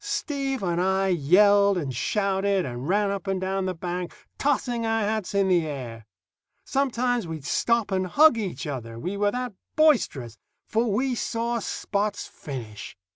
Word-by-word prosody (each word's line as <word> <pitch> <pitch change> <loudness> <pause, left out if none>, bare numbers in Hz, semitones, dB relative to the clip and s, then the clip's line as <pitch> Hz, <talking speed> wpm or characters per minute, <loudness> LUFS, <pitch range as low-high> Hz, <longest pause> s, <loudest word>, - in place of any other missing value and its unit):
Steve 280 - -2
and 175 -1 0
I 190 +1 +2
yelled 200 +5 +5
and 140 -7 -3
shouted 195 - 0
and 125 +2 -5
ran 205 +1 +2
up 200 0 -4
and 195 -1 0
down 190 0 -1
the 185 - -2
bank, 175 +1 -4 0.3
tossing 250 -4 0
our 225 0 +1
hats 210 -1 -2
in 195 -1 +3
the 175 -4 +2
air. 120 -6 -7 0.6
Sometimes 245 -5 0
we'd 160 -4 -6
stop 230 +5 +1
and 185 -1 0
hug 305 - +6
each 200 -5 -4
other, 120 -6 -5
we 180 +11 -4
were 205 0 +2
that 250 +1 -3 0.2
boisterous, 230 - +2 0.3
for 225 0 0
we 255 +5 +1
saw 235 0 -1
Spot's 205 0 -2
finish. 110 -9 -8
200 Hz, 160 wpm, -25 LUFS, 170-230 Hz, 0.6 s, hug